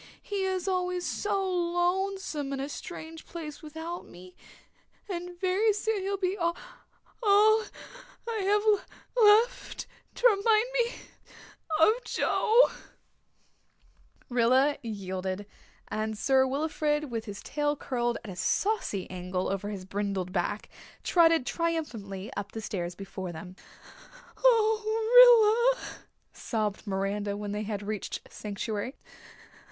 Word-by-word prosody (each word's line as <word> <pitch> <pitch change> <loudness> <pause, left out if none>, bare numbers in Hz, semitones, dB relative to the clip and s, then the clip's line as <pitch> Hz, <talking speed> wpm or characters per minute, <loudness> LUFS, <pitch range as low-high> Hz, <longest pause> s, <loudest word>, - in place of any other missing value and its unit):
He 400 -2 -3
is 375 -1 -2
always 360 -1 -1
so 405 -1 -1
lonesome 350 -3 -1
in 270 - -3
a 275 +2 -3
strange 325 +1 -8
place 310 -4 -7
without 320 +3 -7
me 180 +1 -14 0.7
and 355 -2 -6
very 385 +4 +2
soon 420 0 -1
he'll 395 +1 -1
be 375 0 0
all 340 -3 0 0.7
I'll 435 +1 +5 0.6
have 420 -2 +1 0.5
left 455 +1 +4 0.3
to - - -3
remind 430 +1 +3
me 485 -1 +1 0.9
of 440 +9 +4
Joe." 470 +3 +3 1.6
Rilla 255 +4 +3
yielded, 190 -3 -4 0.4
and 215 0 -3
Sir 265 +3 +3
Wilfrid, 295 0 -1
with 225 -1 -3
his 205 -1 -8
tail 295 0 -1
curled 240 -4 -1
at 210 - -7
a - - -8
saucy 200 - 0
angle 185 0 -3
over 195 +1 -2
his 195 -3 -6
brindled 195 -2 -3
back, 190 +3 -1 0.4
trotted 330 -5 +4
triumphantly 250 - -3
up 200 0 -5
the 225 - -5
stairs 180 -4 -4
before 190 -2 -6
them. 180 +3 -9 0.8
"Oh, 450 +1 +6
Rilla," - - -10 0.3
sobbed 215 -2 -3
Miranda, 200 +1 -1
when 205 0 -4
they 210 +1 -2
had 210 -1 -4
reached 210 0 -4
sanctuary. 210 +4 -4
300 Hz, 115 wpm, -29 LUFS, -, 1.6 s, Oh